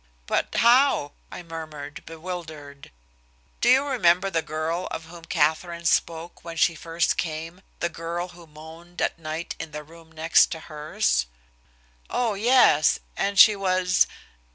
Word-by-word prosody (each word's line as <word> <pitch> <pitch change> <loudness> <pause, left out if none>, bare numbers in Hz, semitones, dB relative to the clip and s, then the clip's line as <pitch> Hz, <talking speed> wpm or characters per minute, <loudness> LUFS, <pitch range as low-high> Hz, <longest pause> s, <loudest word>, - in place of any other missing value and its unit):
"But, - - -1
how?" 240 - +4 0.2
I - - -8
murmured, 155 -3 -8
bewildered. 160 -4 -8 0.7
"Do 240 - +3
you 265 +3 +5
remember 195 -8 +2
the 165 -2 +1
girl 160 +3 -3
of 160 - -6
whom 165 0 -12
Katherine 170 +3 0
spoke 165 +1 -1
when 165 -1 -8
she 165 - +3
first 165 +1 -1
came, 165 +2 -4 0.2
the 170 - +2
girl 170 +1 -5
who 175 -1 -15
moaned 160 +3 -13
at - - -1
night 160 +1 -5
in 160 -2 -7
the 150 0 -6
room 165 +1 -17
next 160 +1 +3
hers?" 150 - -1 0.8
"Oh, 235 -3 0
yes! 215 - +4 0.2
And 200 0 -1
she 210 +1 +8
was 185 -2 +2
165 Hz, 140 wpm, -25 LUFS, 160-180 Hz, 0.8 s, she